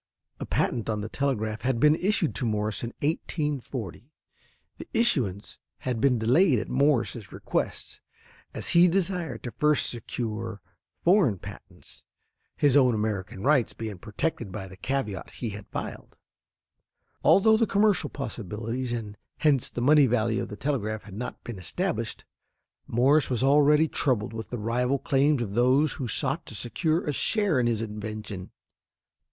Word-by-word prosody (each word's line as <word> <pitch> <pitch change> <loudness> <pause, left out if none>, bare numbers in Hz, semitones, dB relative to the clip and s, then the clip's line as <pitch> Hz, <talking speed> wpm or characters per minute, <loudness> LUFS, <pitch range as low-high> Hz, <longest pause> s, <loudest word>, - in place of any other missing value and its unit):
A - - -5
patent 115 -2 0
on 105 -1 -1
the 105 - -5
telegraph 110 -6 -1
had 130 -2 0
been 150 +3 +6
issued 180 -1 0
to 125 - -3
Morse 105 -1 -1
in 115 - -3
1840. 140 - -3 0.7
The - - -8
issuance 130 - 0 0.2
had 125 -3 -3
been 130 -2 +4
delayed 130 - +4
at - - -3
Morse's 130 -5 +1
request, - - -3 0.5
as - - -5
he 170 +1 +6
desired 175 - -1
to 120 - -5
first 150 +6 +1
secure 115 -2 -4 0.4
foreign 175 - +4
patents, - - -12 0.5
his 145 -2 +3
own 130 -4 +5
American 100 -3 -3
rights 135 -3 +3
being 110 -5 -6
protected 110 - -3
by 95 +1 -6
the 95 - -12
caveat 110 -3 -3
he 115 -3 -4
had 100 0 -9
filed. - - -6 1.1
Although 220 +3 +6
the 225 0 +2
commercial 200 -7 +2
possibilities, 115 0 -4
and 105 -3 -4 0.2
hence 145 -5 +2
the 120 - -5
money 145 +2 +6
value 115 -1 +1
of - - -5
the 105 - -7
telegraph 110 -5 -2
had 105 - -12
not 120 +5 -6
been 115 -5 -7
established, 120 - -3 0.6
Morse 135 +6 +3
was 125 -1 0
already 150 +3 +5
troubled 115 -8 0
with 110 -1 -6
the 120 - -4
rival 125 +5 0
claims 140 -2 +2
of 100 -3 -6
those 130 +6 +3
who 130 - -4
sought 110 - -2
to - - -8
secure 160 +7 -1
a 150 - 0
share 200 - +1
in 120 - +2
his 115 -1 0
invention. 105 -3 -6
125 Hz, 155 wpm, -27 LUFS, 110-150 Hz, 1.1 s, been